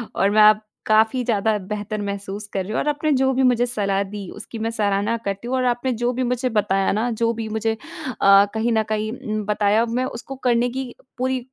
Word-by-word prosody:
और 195 - +3
मैं 215 +1 +5
अब 215 0 +2 0.2
काफ़ी 220 +4 +3
ज़्यादा 220 -2 +1
बेहतर 210 +2 -4
महसूस 200 +1 -5
कर 190 - -1
रही 195 - -7
हूँ 220 - 0
और - - -2
आपने 295 +1 0
जो 265 0 +3
भी 260 +1 +1
मुझे 245 -1 +3
सलाह 200 -5 -1
दी 200 -1 -7
उसकी 220 +2 -8
मैं 225 +1 -1
सराहना 210 0 0
करती 200 +4 -3
हूँ 260 - -1
और 255 - 0
आपने 245 +1 0
जो 245 - +2
भी 255 +1 -1
मुझे 250 +1 0
बताया 195 -3 +1
ना 220 +4 0
जो 230 +1 +1
भी 225 -1 -5
मुझे 220 +1 -1
अ, 200 -3 +2
कहीं 225 +2 0
न 220 - +2
कहीं 215 0 -1
उम, 215 -3 -4
बताया 210 +2 +2
मैं 245 +3 -1
उसको 260 +2 -7
करने 240 0 +3
की 255 0 -5 0.2
पूरी 260 +1 0
220 Hz, 225 wpm, -22 LUFS, 205-245 Hz, 0.2 s, मैं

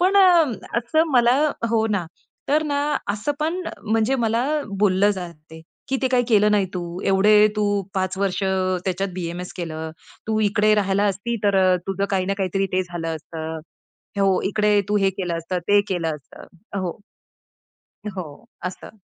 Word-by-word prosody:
पण 375 +3 +3
अ, 385 -2 +8 0.5
असं 315 +8 +1
मला 245 0 +5 0.3
हो 225 -1 +2
ना. 200 -4 0 0.4
तर 300 +3 +3
ना 285 -1 0 0.3
असं 210 +8 -2
पण 330 +4 0 0.3
म्हणजे 225 +4 +2
मला 230 +2 +1 0.4
बोललं 200 0 +4
जातंय, 165 -4 -8 0.3
की 265 - +1
ते 260 - +3
काही 250 -1 +2
केलं 210 -2 +4
नाही 200 -2 +3
तू. 175 0 -5
एवढे 210 +2 +5
तू 205 -1 +1
5 190 0 -1
वर्ष 200 0 -1
अ, 185 -1 +1
त्याच्यात 195 +1 -1
बी-एम-एस 180 0 -5
केलं. 160 -2 -5 0.4
तू 220 0 0
इकडे 215 +1 +3
राहायला 200 -1 +1
असती 235 +5 -3
तर 200 -1 +3
अ, 185 0 +4
तुझं 195 0 -1
काही 190 -2 0
ना 195 - 0
काहीतरी 195 0 0
ते 185 0 +2
झालं 170 -2 -4
असतं. 160 +1 -6 0.6
हो, 195 -1 +3
इकडे 210 0 +2
तू 210 - +2
हे 195 -1 +3
केलं 180 -3 -3
असतं, 175 +2 -3
ते 205 0 +6
केलं 170 -4 -1
असतं 140 - -15 0.3
हो. 180 -3 -2 1.2
हो, 185 -3 -5 0.4
असं. 180 +4 -7
195 Hz, 165 wpm, -22 LUFS, 180-215 Hz, 1.2 s, अ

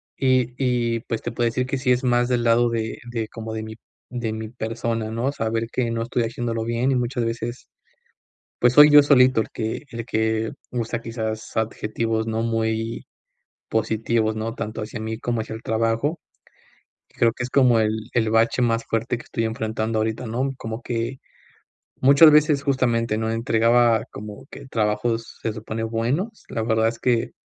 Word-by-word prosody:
y 130 -2 +2
y, 120 -3 0
pues, 115 -1 -4
te 120 - -4
puedo 120 0 0
decir 125 +2 0
que 135 - -1
sí 130 -1 +1
es 125 +1 +2
más 120 0 +2
del 120 -2 +1
lado 120 +1 +4
de 110 -1 -2
de 115 -2 -2
como 110 -1 -7
de 110 0 -4
mi 110 0 -8 0.3
de 120 -2 -3
mi 110 0 -5
persona, 115 -1 -3
¿no? 120 +5 -1
Saber 115 -2 -1
que 120 -2 -1
no 115 0 -2
estoy 120 +1 -1
haciéndolo 115 0 -2
bien 120 +3 0
y - - +2
muchas 120 -1 -1
veces, 115 +1 -4 0.9
pues 120 0 +4
soy 150 +3 +9
yo 145 0 +9
solito 130 -4 +5
el - - -11
que 110 0 -3
el 115 -1 -6
que 110 -1 0 0.2
usa, 115 -1 -3
quizás, 110 -1 -5
adjetivos 110 0 -1
no 110 0 -1
muy 115 0 -1 0.6
positivos, 110 0 0
¿no?, 115 +1 -3
tanto 110 -1 -5
hacia 110 +1 -6
mí 110 0 -4
como 120 -2 -1
hacia 110 - -7
el 110 - -9
trabajo. 115 +8 0 0.9
Creo 115 - +3
que 120 - -4
es 125 - -4
como 125 -4 +4
el 110 0 -1
el 110 -2 +2
bache 115 +3 +2
más 115 -1 +1
fuerte 115 +2 -1
que - - -11
estoy 115 - -3
enfrentando 110 0 -2
ahorita, 110 +3 -2
¿no? 125 +5 -1
Como 115 0 -6
que, 120 +2 -3 0.8
muchas 140 +4 +8
veces, 150 -1 +4
justamente, 120 -5 +1
¿no?, 110 0 -1
entregaba 115 0 +3
como 105 +5 -9
que - - -10
trabajos 115 0 -1
se 110 - -2
supone 110 +1 -5
buenos. 125 - -2
La 115 - -2
verdad 110 0 +2
es 115 0 -3
que 120 -2 +1
115 Hz, 180 wpm, -23 LUFS, 110-125 Hz, 0.9 s, soy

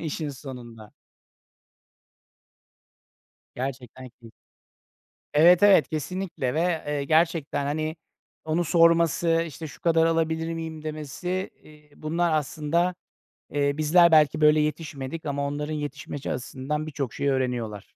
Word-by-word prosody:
işin 155 -1 -3
sonunda. 125 -6 -10 2.6
Gerçekten 130 0 -6
keyif 115 -2 -17 1.0
Evet, 170 +5 +6
evet, 190 -9 +6
kesinlikle, 160 -4 -3
ve, 165 0 0
eee, 145 -1 -1
gerçekten, 160 -2 +1
hani, 155 +2 -2 0.5
onu 160 +2 0
sorması, 165 0 +3
işte, 160 +1 -8
"Şu - - -14
kadar 165 -1 +3
alabilir 165 0 0
miyim?" 160 -1 -6
demesi, 155 +5 -4
eee, 150 -1 -18
bunlar 165 +2 -1
aslında, 155 +4 0 0.6
eee, 140 -1 +1
bizler 170 +2 +5
belki 155 0 +5
böyle 150 0 +5
yetişmedik 150 0 -4
ama 140 0 -1
onların 150 +2 -3
yetişmesi 145 -1 -5
açısından 140 +4 -4
birçok 140 -5 -4
şey 140 - -1
öğreniyorlar. 120 -6 -2
155 Hz, 115 wpm, -25 LUFS, 140-165 Hz, 2.6 s, Evet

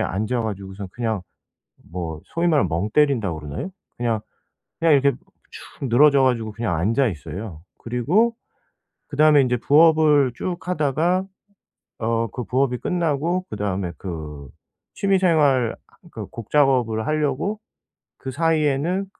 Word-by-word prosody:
앉아 110 +6 -1
가지고서는 100 -2 -6
그냥 110 -4 -2 0.7
뭐 80 -3 -5
소위 170 +1 -1
말하면 145 - +3
'멍 85 +6 -2
때린다.'고 115 - +2
그러나요? 75 - -6 0.3
그냥, 115 -3 -1 0.6
그냥 165 -2 +4
이렇게 140 0 +4 0.4
축 135 - -8
늘어져 140 +3 +5
가지고 115 -4 +1
그냥 110 -6 -2
앉아 115 - +2
있어요. 90 0 -7 0.2
그리고 165 - +1 0.7
그다음에 150 -1 +5
인제 125 -1 0
부업을 150 -2 +4
쭉 180 +5 -3
하다가 175 +3 0 0.7
어 115 0 0
그 125 - -5
부업이 125 -1 0
끝나고 170 +1 -1
그다음에 100 -4 -3
그 75 -6 -7 0.5
취미 195 -1 +1
생활 145 -9 +3
하 - - -24
그 - - -7
곡 115 -3 -9
작업을 125 -7 +2
하려고 155 +7 -1 0.6
그 130 - -6
사이에는 160 +4 +1
130 Hz, 290 characters per minute, -22 LUFS, 110-155 Hz, 0.7 s, 늘어져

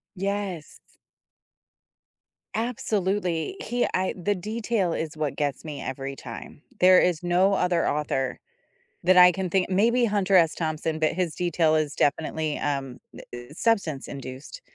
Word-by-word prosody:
Yes. 195 -4 -4 1.7
Absolutely. 205 - -1
He 245 0 0
I 185 0 0
the 200 +3 0
detail 215 -1 -1
is 160 -1 -4
what 155 -2 -2
gets 145 -3 -2
me 150 -3 -6
every 135 +1 -5
time. 125 +2 -10 0.2
There 185 0 +7
is 175 -3 +1
no 180 +3 +3
other 180 -3 +1
author 135 -3 -1 0.6
that 185 +1 +4
I 180 0 +9
can 190 0 -3
think 185 +1 +1
maybe 235 +6 +3
Hunter 200 -3 +1
S. 165 -3 +5
Thompson, 155 -1 -2
but 155 -1 +1
his 175 -3 -2
detail 165 -2 +1
is 155 -2 0
definitely, 155 +1 0
um, 135 -3 -3 0.2
eh - - -10
eh, 120 0 -7
substance-induced, 150 - -3
175 Hz, 140 wpm, -25 LUFS, 150-195 Hz, 1.7 s, I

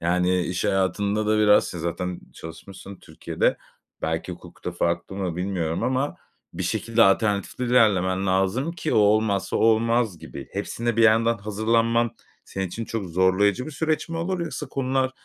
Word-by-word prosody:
Yani 90 +1 +1
iş 90 +1 -3
hayatında 100 +3 0
da 110 0 +2
biraz 105 -1 +5
si 90 - -6
zaten 85 +2 -3
çalışmışsın 95 +4 -10
Türkiye'de. - - -2 0.5
Belki 80 +3 -2
hukukta 90 0 -8
farklı 85 +2 -2
mı 90 -4 -3
bilmiyorum 90 -3 -2
ama 130 +3 -1 0.4
bir 90 +2 -4
şekilde 115 +5 +1
alternatifli 100 +3 +1
ilerlemen 100 -6 +3
lazım 95 - +1
ki 160 -2 -3
o - - +5
olmazsa, 105 -1 +2
o - - 0
olmaz 115 -3 +2
gibi. - - -9
Hepsine 120 -1 -2
bir 115 - +4
yandan 115 +1 +4
hazırlanman 115 +3 +1 0.3
senin 95 0 -4
için 115 +6 -5
çok 110 -3 -4
zorlayıcı 95 - +2
bir - - -6
süreç 160 +2 -1
mi 165 - -4
olur, 175 +2 -2
yoksa 155 -3 -4
konular 130 -1 0
105 Hz, 155 wpm, -24 LUFS, 90-115 Hz, 0.5 s, biraz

